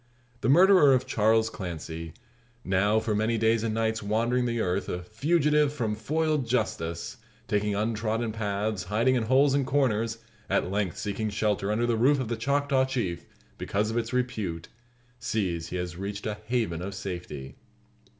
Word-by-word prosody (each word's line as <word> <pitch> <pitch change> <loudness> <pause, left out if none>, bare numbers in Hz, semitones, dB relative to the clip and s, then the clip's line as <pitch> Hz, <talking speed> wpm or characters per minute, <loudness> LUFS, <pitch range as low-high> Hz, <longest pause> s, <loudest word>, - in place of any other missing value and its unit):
The 120 - 0
murderer 175 -3 +7
of 130 - 0
Charles 110 +1 +2
Clancy 80 -3 -6 0.5
now 100 +3 +2
for 110 -1 -1
many 110 +2 +1
days 110 0 +2
and 110 -1 -1
nights 110 -1 0
wandering 115 +4 +1
the 120 0 -1
earth, 90 -4 -1
a 90 0 -3
fugitive 150 - +2
from 120 -7 -2
foiled 150 +4 0
justice, 85 -9 -2 0.3
taking 105 -2 0
untrodden 110 +1 -1
paths, 105 -2 -2
hiding 115 +7 +2
in 125 - +2
holes 130 +5 +4
and 140 0 +2
corners, 115 -5 +1 0.3
at 95 -1 +1
length 100 -4 -1
seeking 105 +1 -2
shelter 105 -1 0
under 115 +3 +1
the 120 -1 +1
roof 135 +5 +4
of 125 -4 -3
the 115 - 0
Choctaw 140 +3 +1
Chief, 110 -11 -3 0.3
because 105 +2 -1
of 115 - -2
its 115 0 -4
repute, 110 -10 -2 0.5
sees 95 -8 -2
he 90 - -6
has 90 -1 -4
reached 100 +2 -5
a 105 -1 -3
haven 110 -9 -1
of 100 +2 -5
safety. 85 -8 -6
110 Hz, 165 wpm, -27 LUFS, 100-125 Hz, 0.5 s, murderer